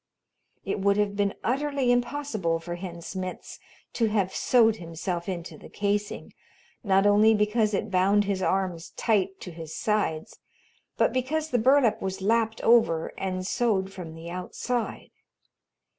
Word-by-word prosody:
It - - -2
would 200 +1 +2
have 205 -1 0
been 200 -1 0
utterly 275 0 +1
impossible 240 - 0
for 175 +1 -6
Hen 175 -1 -7
Smitz 185 0 -6 0.3
to 230 - +1
have 200 -3 0
sewed 225 -3 +3
himself 170 +1 -4
into 175 -2 -6
the - - -13
casing, 205 +1 -2 0.5
not 195 -2 +3
only 210 +2 +5
because 210 0 +1
it 205 +1 -3
bound 195 +3 +3
his 195 -1 -2
arms 185 -3 -1
tight 195 -4 +1
to 180 - -7
his 160 -1 -8
sides, 210 -8 -1 0.6
but - - +2
because 305 +5 -1
the 245 - +2
burlap 250 -2 +4
was 190 0 -3
lapped 225 +2 +1
over 225 -9 +3
and 185 -1 -3
sewed 195 -3 0
from 170 -4 -8
the 165 +1 -9
outside. 225 +6 -4
200 Hz, 145 wpm, -26 LUFS, 185-225 Hz, 0.6 s, only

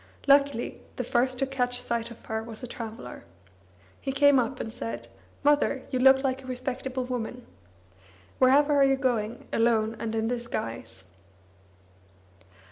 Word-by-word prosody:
Luckily, 280 -3 +3
the 250 - -2
first 250 +2 +1
to 270 - +1
catch 250 -2 -1
sight 235 -1 -2
of 235 - -13
her 220 0 -2
was 225 +1 -7
a - - -4
traveller. 225 - -8 0.8
He 270 - -3
came 280 0 +5
up, 250 +2 -2
and 225 - -5
said: 115 +1 -5 0.4
"Mother, 290 -2 +3
you 255 - 0
look 265 +1 +6
a 265 0 -1
respectable 255 0 -3
woman. 245 -1 -5 0.9
Wherever 285 +3 +5
are 280 -1 +5
you 270 0 +4
going, 240 -4 -1
alone 225 -1 +2
and 225 0 -3
in 220 0 0
this 240 0 -3
guise?" 115 - -5
250 Hz, 145 wpm, -27 LUFS, 225-265 Hz, 0.9 s, look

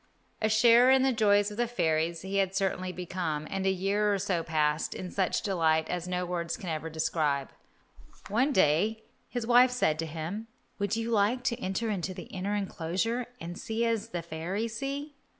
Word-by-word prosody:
A 215 - +2
sharer 235 +3 +6
in 265 0 +5
the 265 -1 +3
joys 205 -2 +3
of 210 - -8
the 240 0 +1
fairies 165 -7 0
he 195 +1 -2
had 195 0 +1
actually 185 -1 -1
become, 175 -4 -3
and 195 0 -1
a - - +5
year 200 +3 +1
or 200 - +2
so 180 -2 0
passed 155 -1 0
in 185 -1 -6
such 190 -2 0
delight 160 -5 +1
as 180 0 -3
no 180 0 -1
words 170 -1 -3
can 180 - -6
ever 160 0 -3
describe. 155 -3 -1 0.8
One 250 +8 +2
day 205 - +2 0.3
his 245 -2 -3
wife 245 +2 +6
said 200 -11 +1
to 165 - -2
him, 165 +8 -5 0.3
"Would 200 +1 0
you 230 +1 -2
like 225 +4 +2
to 235 -1 -1
enter 205 +3 -2
into 185 -2 -3
the - - -7
inner 195 +2 -2
enclosure 200 +5 -2
and 175 +1 -6
see 225 +1 -1
as 230 -1 -1
the 175 -5 -4
fairies 185 +8 -3
see?" 280 +3 -4
195 Hz, 190 wpm, -29 LUFS, 170-225 Hz, 0.8 s, sharer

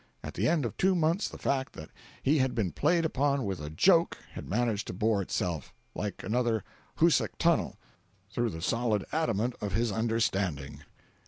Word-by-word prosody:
At - - -6
the 105 +6 0
end 160 -4 +2
of 110 -2 -4
two 190 0 +3
months 170 +4 +1
the - - -9
fact 135 -1 -1
that 80 - -10 0.3
he 145 +3 +3
had 130 -1 +1
been 100 -7 0
played 170 - +2
upon 140 -3 +1
with 95 -2 -3
a 75 - -5
joke 165 - +4
had - - -8
managed 110 -1 0
to - - -4
bore 105 +1 +2
itself, 85 -5 -3 0.2
like 105 -1 -4
another 115 0 0 0.3
Hoosac - - +3
Tunnel, - - +2 0.5
through 120 +1 0
the 80 -4 -6
solid 115 -2 +1
adamant 120 -6 +1
of 100 -2 -3
his 115 +2 +1
understanding. 100 -9 -1
115 Hz, 175 wpm, -29 LUFS, 100-135 Hz, 0.5 s, joke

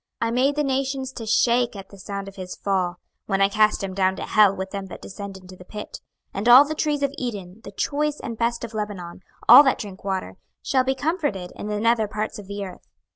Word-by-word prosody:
26:031:016 - - +1
I - - -2
made 265 +4 +2
the 295 - +1
nations 270 -1 -1
to 235 -4 -7
shake 240 +1 +2
at 195 -1 -9
the 200 - -14
sound 200 +1 -6
of 195 - -10
his 185 -1 -7
fall, 185 -3 -1 0.3
when 195 -1 0
I 195 - +5
cast 215 0 +2
him 190 -1 -3
down 190 0 +1
to - - -6
hell 205 -2 +4
with 190 0 -5
them 195 -1 -5
that - - -9
descend 200 -1 -8
into 185 0 -13
the 180 - -13
pit: 210 +3 -8 0.3
and 205 +5 0
all 255 +4 +10
the 310 - -2
trees 295 -2 -1
of 280 0 0
Eden, 205 -5 -5
the 200 - -9
choice 295 +8 -1
and 230 - -5
best 235 +1 -1
of 230 -1 -6
Lebanon, 200 -5 -5 0.3
all - - +11
that 265 -3 +2
drink 195 -3 -8
water, 190 - -3 0.3
shall 260 -1 +2
be 265 +1 0
comforted 265 - -2
in - - -6
the 210 0 -2
nether 230 0 +2
parts 215 +1 -4
of 200 - -11
the 200 0 -5
earth. 185 - -11
210 Hz, 240 wpm, -23 LUFS, 195-255 Hz, 0.3 s, all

